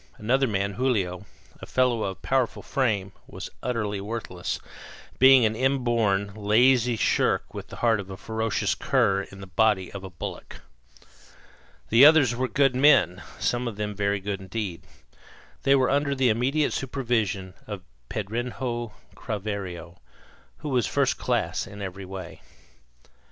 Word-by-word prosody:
Another 130 +5 +2
man, 100 -2 -1
Julio, 100 -7 -1 0.3
a - - -8
fellow 125 -3 +2
of 95 -1 -6
powerful 130 -3 0
frame, 105 -8 0 0.2
was - - -8
utterly 105 -5 -2
worthless, 100 -4 -4 0.6
being 130 -2 +7
an 110 0 +1
inborn, 115 -6 +1
lazy 120 +4 +3
shirk - - +1
with - - -7
the - - -10
heart 115 -2 +4
of 100 -1 -7
a 95 - -7
ferocious 110 +1 -1
cur 95 0 +1
in 95 0 -11
the - - -7
body 95 -1 +1
of 100 -1 -8
a 95 - -7
bullock. 85 -3 -8 1.3
The 115 +4 +6
others 145 -5 +7
were 130 +1 -1
good 135 -1 +2
men, 130 - +4 0.2
some 120 0 -1
of 115 - -4
them 105 0 -3
very 100 0 0
good 100 0 -4
indeed. 95 -2 -4 0.8
They 135 - +4
were 130 -2 +2
under 140 0 +1
the 130 -2 +3
immediate 135 +7 +1
supervision 115 -8 -1
of 100 -4 -6 0.3
Pedrinho 120 +2 -3 0.2
Craveiro, 95 -5 -5 0.6
who 150 - -6
was 125 -5 +1
first - - +1
class - - -1
in 100 - -10
every 95 -1 -6
way. 95 -2 -8
110 Hz, 145 wpm, -26 LUFS, 100-125 Hz, 1.3 s, being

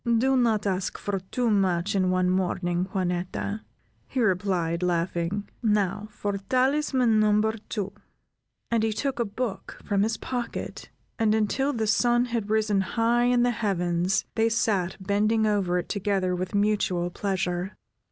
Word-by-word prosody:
"Do 265 +3 +3
not 230 -5 +2
ask 190 -1 -1
for 200 -1 -2
too 230 +5 -1
much 190 -1 +1
in 185 -2 +2
one 185 0 +2
morning, 180 -1 0
Juanetta," 185 +3 -2 0.5
he 265 - -3
replied, 185 -5 +1
laughing. 175 +2 -1
"Now 210 -2 +1
for 205 -1 -3
talisman 255 +1 +2
number 215 +1 +3 0.2
two," 200 -3 -3 0.8
and 230 -1 +2
he 220 0 +1
took 270 +4 -2
a 235 - +2
book 220 +1 -5
from 200 -2 +1
his 220 +2 +1
pocket, 245 -2 -5 0.3
and 220 -1 +3
until 255 +6 +1
the 225 -5 -1
sun 240 +3 +3
had 220 -3 -1
risen 215 -2 +2
high 230 +5 +1
in 245 0 +3
the 245 - +3
heavens, 180 -4 0
they 225 0 +2
sat 205 -5 0
bending 210 +3 +1
over 195 -4 +1
it 175 - -3
together 195 -3 0
with 185 +3 -4
mutual 200 -4 +1
pleasure. 185 -1 -2
205 Hz, 150 wpm, -26 LUFS, 185-225 Hz, 0.8 s, Do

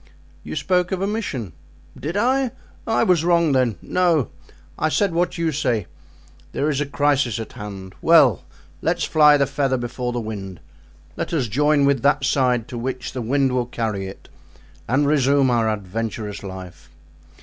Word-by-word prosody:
"You - - -6
spoke 180 -1 +1
of 190 - -1
a 195 - 0
mission." 155 - -3 0.4
"Did 165 +7 -4
I? 260 +4 +2 0.4
I 225 - +2
was 175 -4 +3
wrong 170 -2 +3
then, 130 -5 +2
no, 170 - +1 0.5
I 155 - +2
said 170 +6 +1
what 175 +1 0
you 165 -1 0
say—there 130 - -4
is 140 0 -1
a 145 - -1
crisis 140 -5 +1
at 110 - -7
hand. 95 -2 -8
Well! 150 - +5 0.4
let's - - 0
fly 150 -1 +5
the 140 - +3
feather 135 -1 0
before 125 0 -3
the 120 - -2
wind; 100 -6 -6 0.6
let - - -4
us 140 -7 +1
join 145 +5 +2
with 140 -3 +2
that 140 0 +2
side 125 -4 +1
to 120 - -5
which 130 +1 -4
the 130 - -3
wind 135 +3 +1
will 125 -1 0
carry 110 -5 -3
it 95 - -11 0.6
and 135 +4 +2
resume 140 -2 +3
our 115 -2 +2
adventurous 105 0 -4
life. 95 -2 -9
135 Hz, 165 wpm, -22 LUFS, 115-155 Hz, 0.6 s, Well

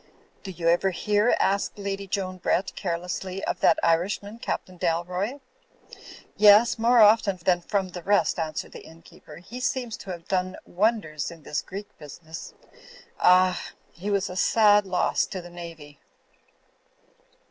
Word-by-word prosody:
"Do 195 - -8
you 175 -2 -4
ever 175 +3 +3
hear," 205 +5 +1
asked 200 +2 0
Lady 200 -1 -4
Joan 185 -1 -3
Brett, 185 +2 0
care 170 -3 -2
lessly, 185 +2 -5
"of - - -2
that 165 - +4
Irishman, 200 +6 0
Captain 185 -5 -4
Dalroy?" 180 +9 -2 0.9
"Yes, 210 +3 +6
more 235 +1 +5
often 210 -2 +5
than 175 -1 +3
from 195 +1 -1
the 175 0 -8
rest," 200 0 +1
answered 155 -2 -4
the - - -10
innkeeper. 160 -1 -15
"He 205 +10 -10
seems 250 -3 -2
to - - -11
have 170 -2 -7
done 185 -1 -1
wonders 180 -7 -1
in 165 -3 -13
this 150 - -2
Greek 200 +2 -9
business. 160 +2 -10 0.6
Ah! 185 0 +4 0.3
He 190 +5 -6
was 200 -1 0
a 180 - -7
sad 205 +1 +4
loss 180 -1 +1
to 190 - -6
the 175 0 -11
Navy!" 165 -4 -10
185 Hz, 150 wpm, -25 LUFS, 170-205 Hz, 0.9 s, Yes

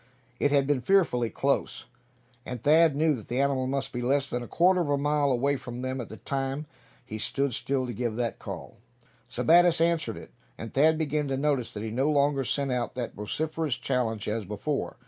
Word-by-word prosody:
It 145 - +3
had 140 -1 +3
been 145 -1 +1
fearfully 125 -6 +2
close, - - -1 0.6
and 125 -2 -7
Thad 155 0 +5
knew 155 +1 +3
that 115 -6 -7
the 125 +2 -2
animal 135 -2 +1
must 135 0 -2
be 120 - -3
less 135 +2 +1
than 125 - -1
a 120 - -7
quarter 180 +1 +3
of 155 - -2
a 145 - +2
mile 145 0 +1
away 140 +3 +1
from 125 0 -7
them 130 0 -2
at 115 - -8
the 110 - -9
time 135 +2 -3 0.4
he 110 -3 -6
stood 140 +4 0
still 130 +3 -1
to 120 - -5
give 120 -2 -2
that 120 -1 -2
call. - - -8 0.5
Sebattis 170 0 +4
answered 165 -9 +1
it, - - -11 0.3
and 115 - -7
Thad 155 +3 +4
began 150 -2 -1
to 135 -1 -1
notice 140 -4 0
that 105 - -5
he 110 - -4
no 130 +6 +1
longer 140 -2 +2
sent 140 +2 -1
out 125 -1 -2
that 125 -2 -4
vociferous 155 +6 -2
challenge 120 -5 -1
as 110 +1 -1
before. 105 +9 -3
135 Hz, 205 wpm, -27 LUFS, 120-150 Hz, 0.6 s, Thad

